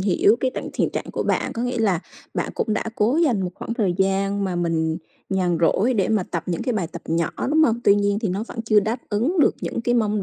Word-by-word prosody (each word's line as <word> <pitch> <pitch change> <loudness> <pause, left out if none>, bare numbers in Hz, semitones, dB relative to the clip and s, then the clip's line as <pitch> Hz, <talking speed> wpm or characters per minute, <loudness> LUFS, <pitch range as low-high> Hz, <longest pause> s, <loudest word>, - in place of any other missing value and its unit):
hiểu 205 +3 +3
cái 260 - +1
tận - - -4
thiện - - 0
trạng - - -4
của - - -1
bạn, - - 0
có 230 - -3
nghĩa 245 -1 -1
là 195 -7 +2 0.3
bạn - - -1
cũng 215 - -1
đã - - -1
cố 225 +8 +2
dành 270 - +2
một 180 - -2
khoảng 230 - -5
thời 200 -6 +1
gian 195 +1 +1
mà 185 -2 -2
mình 160 -2 0 0.3
nhàn 180 -3 +1
rỗi 220 +9 +3
để 200 -4 +1
mà 215 -4 +2
tập 170 -2 -4
những 175 -2 -2
cái 250 - -1
bài 190 -6 -1
tập 170 0 -9
nhỏ, 165 +1 0 0.2
đúng 315 +1 +4
hông? 235 -3 +1
Tuy 200 - +7
nhiên 205 0 +1
thì 220 -4 -1
nó 195 +4 -2
vẫn 230 - -5
chưa 215 -2 +4
đáp 220 +4 -2
ứng 260 - +1
được - - +4
những - - -3
cái 240 +1 +1
mong 210 -3 +1
205 Hz, 265 wpm, -23 LUFS, 185-230 Hz, 0.3 s, Tuy